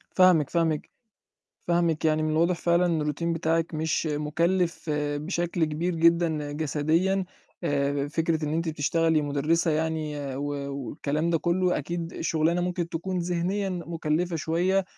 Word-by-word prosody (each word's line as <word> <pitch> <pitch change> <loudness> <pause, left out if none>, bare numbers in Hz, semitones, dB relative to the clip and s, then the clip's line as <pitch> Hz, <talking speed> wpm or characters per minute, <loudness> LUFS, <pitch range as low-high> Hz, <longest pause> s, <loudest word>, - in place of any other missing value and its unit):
فاهمِك، 180 -6 +5
فاهمِك. 165 -3 0 0.7
فاهمِك، 170 -2 +1
يعني 155 0 +3
من 155 - 0
الواضح 170 +3 +2
فعلًا 170 +1 +2
إن 165 -3 0
الRoutine 150 +2 -3
بتاعِك 165 0 0
مش 160 +1 0
مُكلِّف 165 +3 0
بشكل 155 +4 -1
كبير 160 +4 -2
جدًا 165 -3 +2
جسديًا، 160 +6 +1 0.4
آآ 140 -2 0
فكرة 160 +1 0
إن 150 - -2
أنتِ 165 +1 -1
بتشتغلي 160 +1 +1
مُدرِّسة 150 +4 +1
يعني 150 -3 -2
و 140 0 -3
والكلام 150 +4 -2
ده 165 - +2
كُلّه، 180 +2 +1
أكيد 170 +3 -5
شُغلانة 165 +2 +1
ممكن 175 -1 -2
تكون 180 +3 -3
ذِهنيًا 180 +3 -1
مُكلِّفة 170 -1 -2
شوية 180 +5 +1
165 Hz, 135 wpm, -26 LUFS, 150-175 Hz, 0.7 s, فاهمِك